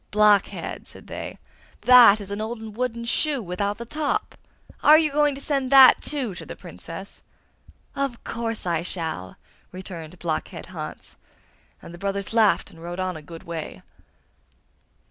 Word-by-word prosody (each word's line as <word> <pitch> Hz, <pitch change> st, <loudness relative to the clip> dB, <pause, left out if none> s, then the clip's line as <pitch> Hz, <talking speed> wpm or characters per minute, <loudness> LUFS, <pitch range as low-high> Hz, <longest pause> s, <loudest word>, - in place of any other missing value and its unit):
'Blockhead!' 210 Hz, -1 st, +2 dB
said -, -, -13 dB
they, -, -, -7 dB, 0.4 s
'that 245 Hz, -4 st, +8 dB
is 200 Hz, -1 st, -7 dB
an 205 Hz, +1 st, -3 dB
old 220 Hz, -1 st, -6 dB
wooden 235 Hz, -1 st, -2 dB
shoe 285 Hz, +4 st, +1 dB
without 200 Hz, 0 st, -3 dB
the 235 Hz, -, -7 dB
top! 300 Hz, +4 st, -2 dB, 0.5 s
Are 305 Hz, +1 st, +8 dB
you 310 Hz, -2 st, +2 dB
going 295 Hz, -1 st, +2 dB
to -, -, -8 dB
send 275 Hz, -3 st, -1 dB
that, 270 Hz, -1 st, +8 dB
too, 270 Hz, -8 st, -2 dB
to -, -, -8 dB
the -, -, -8 dB
Princess?' -, -, -9 dB, 0.7 s
'Of 275 Hz, -4 st, -3 dB
course 230 Hz, -3 st, -4 dB
I 170 Hz, -2 st, 0 dB
shall!' 160 Hz, -, -4 dB, 0.4 s
returned 180 Hz, -2 st, -8 dB
Blockhead 165 Hz, -2 st, -4 dB
Hans; -, -, -8 dB, 0.7 s
and 170 Hz, -, -10 dB
the 175 Hz, -, -11 dB
brothers 200 Hz, +1 st, -3 dB
laughed 220 Hz, -3 st, +3 dB
and 165 Hz, -, -15 dB
rode 175 Hz, +2 st, -6 dB
on 185 Hz, -1 st, -2 dB
a 155 Hz, -, -8 dB
good 165 Hz, +2 st, -11 dB
way. 165 Hz, -2 st, -7 dB
210 Hz, 155 wpm, -24 LUFS, 180-250 Hz, 0.7 s, that